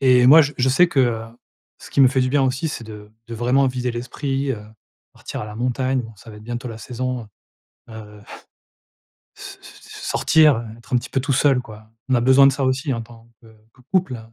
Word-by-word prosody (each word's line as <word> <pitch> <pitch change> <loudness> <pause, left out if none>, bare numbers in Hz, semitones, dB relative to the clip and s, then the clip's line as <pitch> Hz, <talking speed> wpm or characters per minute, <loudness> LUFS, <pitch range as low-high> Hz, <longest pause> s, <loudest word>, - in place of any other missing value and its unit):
et 125 -2 +5
moi 155 +5 +9
je 145 0 -3
je 125 - +2
sais 175 +6 +4
que, 140 - +1
heu, 115 -3 0 0.6
ce - - -13
qui - - +1
me 130 - +7
fait 130 0 0
du 130 - 0
bien 140 0 +2
aussi 135 +5 -1
c'est 120 -6 -6
de 105 -1 -11 0.2
de 115 - -6
vraiment 125 +4 +2
vider 125 -1 -3
l'esprit, 135 +3 -3
heu, 105 -4 -7 0.5
partir - - -8
à 105 - -6
la 105 - -9
montagne. 130 +2 -1
Bon, 115 -1 -11
ça 110 +4 -14
va 105 - -12
être 105 - -13
bientôt 120 +2 -5
la 110 -1 -8
saison, 125 -1 -5 0.6
heu, 105 -2 -11 1.2
s - - -10
s - - -15 0.3
sortir, 150 -7 +3
être 120 +3 -12
un 125 - +5
petit 120 - -5
peu 135 - 0
tout 135 0 -1
seul 135 -2 +3
quoi. 110 -1 -14 0.2
On 130 - +3
a 120 - +2
besoin 130 +2 +6
de - - +4
ça 140 - -3
aussi, 135 +2 -1
en 115 - -3
tant, 115 0 -16
que 115 - -18 0.3
que 130 - -22
couple. 180 -10 0
125 Hz, 225 wpm, -21 LUFS, 115-135 Hz, 1.2 s, moi